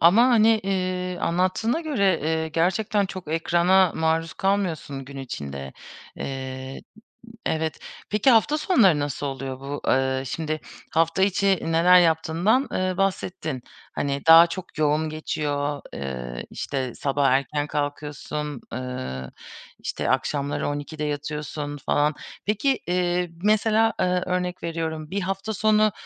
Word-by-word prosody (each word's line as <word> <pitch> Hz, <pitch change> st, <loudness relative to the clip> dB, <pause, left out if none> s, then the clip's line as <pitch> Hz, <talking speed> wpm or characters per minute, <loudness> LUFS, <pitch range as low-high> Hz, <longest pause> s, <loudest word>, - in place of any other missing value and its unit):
Ama, 180 Hz, +8 st, +7 dB
hani, 225 Hz, -3 st, +5 dB
eee, 185 Hz, -2 st, -2 dB
anlattığına 185 Hz, -, +1 dB
göre, 200 Hz, -, +1 dB
eee, 160 Hz, +1 st, 0 dB
gerçekten 190 Hz, +5 st, +1 dB
çok 185 Hz, -4 st, -8 dB
ekrana 175 Hz, +2 st, +3 dB
maruz 160 Hz, 0 st, 0 dB
kalmıyorsun 175 Hz, -8 st, -1 dB
gün 140 Hz, +1 st, -11 dB
içinde. 70 Hz, -, -6 dB, 0.4 s
Eee, 130 Hz, 0 st, -5 dB, 0.7 s
evet, 160 Hz, 0 st, -1 dB, 0.3 s
peki, 210 Hz, +5 st, +4 dB
hafta 255 Hz, +6 st, +4 dB
sonları 230 Hz, -, +4 dB
nasıl 145 Hz, 0 st, -3 dB
oluyor 135 Hz, -1 st, -5 dB
bu? 140 Hz, +1 st, -5 dB
Iıı, 130 Hz, 0 st, +1 dB
şimdi 155 Hz, +3 st, -3 dB, 0.3 s
hafta 165 Hz, +3 st, +2 dB
içi 195 Hz, 0 st, +3 dB
neler 170 Hz, +3 st, +5 dB
yaptığından, 170 Hz, -, +2 dB
eee, 185 Hz, 0 st, 0 dB
bahsettin. 180 Hz, -8 st, -2 dB, 0.3 s
Hani, 140 Hz, -1 st, -2 dB
daha 165 Hz, +1 st, +10 dB
çok 170 Hz, -1 st, -8 dB
yoğun 155 Hz, +1 st, +2 dB
geçiyor. 145 Hz, -2 st, -2 dB
Iıı, 65 Hz, -3 st, -5 dB
işte, 130 Hz, -3 st, -3 dB
sabah 140 Hz, -1 st, +1 dB
erken 140 Hz, +3 st, +1 dB
kalkıyorsun. 145 Hz, -1 st, -4 dB
Iıı, 125 Hz, -, -5 dB, 0.5 s
işte, -, -, -3 dB
akşamları 140 Hz, +2 st, 0 dB
12'de 145 Hz, +1 st, -4 dB
yatıyorsun 150 Hz, 0 st, -4 dB
falan. 150 Hz, +1 st, +2 dB, 0.3 s
Peki, 230 Hz, +6 st, +1 dB
eee, 180 Hz, -1 st, +1 dB
mesela, 220 Hz, +1 st, +3 dB
ııı, 180 Hz, 0 st, +1 dB
örnek 180 Hz, 0 st, -2 dB
veriyorum; 160 Hz, -2 st, -3 dB
bir 200 Hz, -, -1 dB
hafta 195 Hz, +3 st, -3 dB
sonu 215 Hz, +1 st, +3 dB
160 Hz, 125 wpm, -24 LUFS, 145-190 Hz, 0.7 s, daha